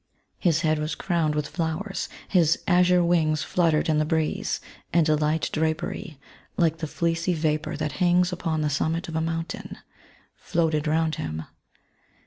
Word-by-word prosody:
His 170 -2 +2
head 155 -2 +2
was 155 +1 -2
crowned 165 -5 0
with 150 -1 -1
flowers; 165 +5 -3 0.2
his 165 -4 +3
azure 180 -1 +4
wings 160 -3 +2
fluttered 165 -4 +2
in 155 -1 +2
the - - +3
breeze, 155 0 -1 0.3
and 165 -1 +3
a 155 - +4
light 150 +1 0
drapery, 160 -1 -2 0.4
like 165 -3 +2
the 160 - -3
fleecy 170 +3 0
vapour 155 -1 -1
that 155 -1 -2
hangs 180 0 +3
upon 165 -3 -1
the 150 - +1
summit 160 +4 -1
of 160 - -6
a 160 - +1
mountain, 165 0 -4 0.6
floated 160 -2 0
round 160 +1 +1
him. 80 0 -4
160 Hz, 155 wpm, -25 LUFS, 155-170 Hz, 0.6 s, azure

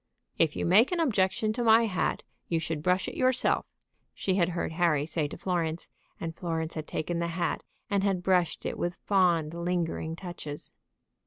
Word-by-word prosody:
"If 160 -2 +3
you - - -1
make 210 - +5
objection 220 - +1
to 240 +2 -1
my 225 0 +6
hat, 185 -5 -1 0.2
you 165 - +1
should 160 -1 -3
brush 180 +3 +1
it - - -4
yourself," 255 0 +2 0.5
she 190 - 0
had 180 -2 +2
heard - - -1
Harry 160 -4 +2
say 155 -1 -1
to - - -8
Florence, 170 -3 -2 0.3
and 165 -1 -4
Florence 165 -2 -3
had 155 -1 -5
taken 170 +2 -2
the 170 - 0
hat, 170 +1 -1 0.3
and 200 -3 +1
had 195 -3 +1
brushed 180 -3 +1
it - - -3
with 175 0 -1
fond, 175 -6 +2
lingering 170 -2 -2
touches. 170 -5 -7
175 Hz, 175 wpm, -29 LUFS, 165-195 Hz, 0.5 s, my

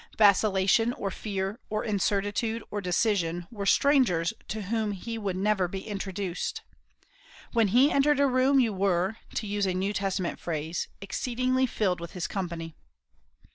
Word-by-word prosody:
Vacillation, 205 +2 +4
or 195 -4 -4
fear, 195 +2 -3
or 215 0 -1
incertitude, 210 +2 0
or 205 - -2
indecision, 180 -3 0
were 200 -4 -4
strangers 220 - +3
to 215 +3 -4
whom 215 +1 -1
he 225 +4 -5
would 200 -4 -2
never 195 -1 +1
be 190 +2 -5
introduced. 195 -3 -4 0.9
When 230 -3 +4
he 255 +8 +5
entered 285 +1 +3
a 280 - +5
room 265 +1 +3
you 230 -4 +2
were, 190 +1 +1 0.2
to - - -1
use 205 -1 0
a 185 - 0
New 195 +3 -1
Testament 195 -3 -2
phrase, 160 0 -3
"exceedingly 255 +6 0
filled 190 -6 0
with 170 -1 -8
his 180 -2 -3
company." 170 -4 -4
200 Hz, 150 wpm, -28 LUFS, 185-225 Hz, 0.9 s, he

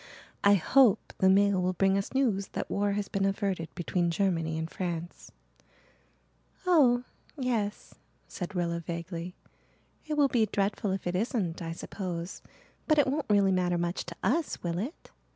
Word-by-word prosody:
"I 200 0 +7
hope 235 +4 +3
the 190 - +5
mail 200 0 +4
will 180 +1 +1
bring 195 +2 +2
us 195 0 -1
news 225 -8 +1
that - - -4
war 205 0 +1
has 205 0 -2
been 195 - -1
averted 195 -4 -1
between 175 0 0
Germany 165 -3 0
and 160 0 -2
France." 175 -1 -5 1.3
"Oh 265 -9 +5 0.3
yes," 230 -6 -2 0.3
said 185 +1 -6
Rilla 170 -1 0
vaguely. 170 +1 -5 0.7
"It 305 - -1
will 290 -1 +5
be 230 -5 +2
dreadful 200 0 -1
if 190 0 -2
it 175 0 -1
isn't, 190 -5 -1
I 165 -1 -4
suppose. 175 -1 -5 0.5
But 310 - +4
it 290 - +5
won't 280 0 -2
really 200 -2 +4
matter 180 -1 +1
much 170 +1 -2
to 170 - -7
us, 290 - 0
will 170 0 -1
it? 255 - -6
195 Hz, 160 wpm, -29 LUFS, 175-215 Hz, 1.3 s, I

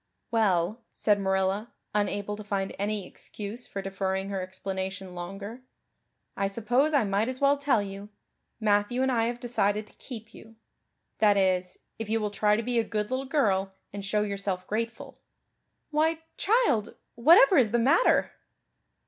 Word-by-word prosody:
"Well," 210 -1 +2
said 210 -1 +2
Marilla, 190 +3 0 0.2
unable 205 0 -1
to 210 - -8
find 200 -2 -2
any 205 -1 -1
excuse 215 +6 -7
for 195 - -5
deferring 190 0 -2
her 195 -1 -2
explanation 190 0 -5
longer, 195 +7 -7 0.7
"I 195 - 0
suppose 240 +8 +1
I 285 -5 +3
might 205 +3 0
as 255 0 -4
well 280 0 +4
tell 280 -7 +1
you. 200 +1 -8 0.5
Matthew 210 +3 +2
and 265 - +2
I 230 -2 +2
have 240 0 -3
decided 215 -4 0
to - - -21
keep 225 -4 -9
you 225 0 -14 0.6
that 210 -2 +5
is, 185 -1 +1 0.2
if 225 -2 -5
you 225 +1 +2
will 210 -1 -2
try 210 0 +3
to 225 - -1
be 240 0 +1
a - - +2
good 210 +1 -3
little 260 +1 -2
girl 195 -10 +1 0.2
and 200 -1 -5
show 210 +1 +1
yourself 195 -2 -3
grateful. 230 +2 -4 0.7
Why, 315 +2 +1
child, 390 - +2 0.2
whatever 345 - +7
is 245 -5 +5
the 240 - +2
matter?" 265 - +4
210 Hz, 160 wpm, -28 LUFS, 195-240 Hz, 0.7 s, whatever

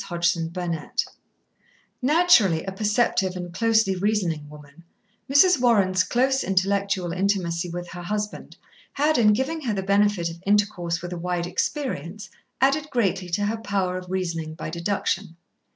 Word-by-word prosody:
Chapter 170 -1 0
Twenty 170 -1 -3
one - - -13 1.1
Naturally 255 - +4
a 195 - -4
perceptive 205 -2 +1
and 175 -1 -6
closely 220 -1 +2
reasoning 180 -7 -1
woman, 150 +1 -14 0.5
Mrs. 285 0 +5
Warren's 195 -7 +3
close 265 +2 +1
intellectual 195 -1 0
intimacy 180 -3 -1
with 175 +1 -6
her 175 - -8
husband 210 +3 -5 0.4
had, 295 -1 +2
in 210 -2 +5
giving 265 +9 -1
her 235 -7 -2
the 190 - -2
benefit 200 -2 +2
of 170 +1 -12
intercourse 195 -5 0
with 175 0 -5
a 175 - -5
wide 175 0 -2
experience, 190 - -3 0.3
added 285 +3 +2
greatly 195 -8 0
to 205 +4 0
her 220 +2 -1
power 195 -4 -1
of 180 -1 -12
reasoning 170 -4 -3
by 155 - -6
deduction. 175 0 -2
190 Hz, 150 wpm, -24 LUFS, 175-215 Hz, 1.1 s, Mrs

